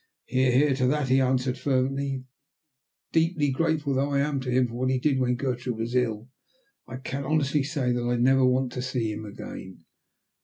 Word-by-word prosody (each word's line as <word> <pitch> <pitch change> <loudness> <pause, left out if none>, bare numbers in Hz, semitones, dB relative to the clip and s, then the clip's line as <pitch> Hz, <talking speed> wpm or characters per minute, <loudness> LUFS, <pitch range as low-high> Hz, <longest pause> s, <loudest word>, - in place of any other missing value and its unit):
"Hear, 130 +1 +2
hear, 140 +3 +4
to 130 -2 +2
that," 145 0 0
he 130 +1 +4
answered 130 0 0
fervently. 135 0 -1 0.9
"Deeply 160 -3 +2
grateful 150 0 0
though 135 +2 +1
I 140 - +2
am 145 -1 0
to 130 -1 -5
him 125 0 +3
for 115 - -10
what 130 +2 -1
he 130 - +2
did 135 +1 +1
when 125 -1 +1
Gertrude 125 -2 -3
was 115 +2 -3
ill, 115 -3 0 0.6
I 130 - -7
can 135 +2 -5
honestly 150 -1 +1
say 135 -3 -1
that 120 0 0
I 120 0 0
never 130 +2 +4
want 130 0 +2
to 125 - -4
see 125 -4 -2
him 110 +1 -7
again." 95 -4 -9
130 Hz, 195 wpm, -26 LUFS, 125-140 Hz, 0.9 s, hear